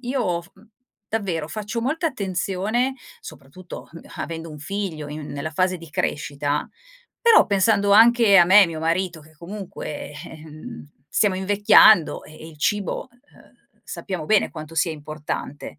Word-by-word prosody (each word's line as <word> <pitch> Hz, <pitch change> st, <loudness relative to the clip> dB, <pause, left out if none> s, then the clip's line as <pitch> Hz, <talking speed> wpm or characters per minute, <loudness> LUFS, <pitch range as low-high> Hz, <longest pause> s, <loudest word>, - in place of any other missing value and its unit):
Io 240 Hz, -9 st, -2 dB
f 175 Hz, -, -20 dB, 0.6 s
davvero 185 Hz, -8 st, -2 dB
faccio 215 Hz, +3 st, -4 dB
molta 310 Hz, +7 st, -1 dB
attenzione 200 Hz, -, -2 dB, 0.3 s
soprattutto, 175 Hz, -, -11 dB
mhmm, 165 Hz, -, -10 dB, 0.2 s
avendo 165 Hz, 0 st, -6 dB
un 150 Hz, -, -10 dB
figlio 160 Hz, -2 st, -4 dB
in 150 Hz, 0 st, -7 dB
nella 145 Hz, +2 st, -5 dB
fase 185 Hz, +2 st, 0 dB
di 165 Hz, -1 st, -12 dB
crescita, 145 Hz, 0 st, -2 dB, 0.5 s
però 465 Hz, -1 st, +6 dB
pensando 200 Hz, 0 st, +2 dB
anche 230 Hz, -1 st, +6 dB
a 175 Hz, -, +8 dB
me 195 Hz, +4 st, +7 dB
e -, -, +4 dB
mio 160 Hz, -2 st, -6 dB
marito 170 Hz, 0 st, -1 dB
che 155 Hz, +1 st, -19 dB
comunque, 185 Hz, -5 st, -7 dB
ehm, 155 Hz, +7 st, -10 dB, 0.2 s
stiamo 200 Hz, +2 st, +2 dB
invecchiando 200 Hz, -2 st, +5 dB
e -, -, -14 dB
e 160 Hz, +1 st, -11 dB
il 155 Hz, -, -15 dB
cibo, 205 Hz, +8 st, -1 dB
uhm, 245 Hz, +4 st, -26 dB
sappiamo 180 Hz, -6 st, -6 dB
bene 215 Hz, +3 st, +3 dB
quanto 155 Hz, 0 st, -9 dB
sia 165 Hz, +1 st, +1 dB
importante. 150 Hz, -1 st, -7 dB
185 Hz, 150 wpm, -22 LUFS, 155-210 Hz, 0.6 s, a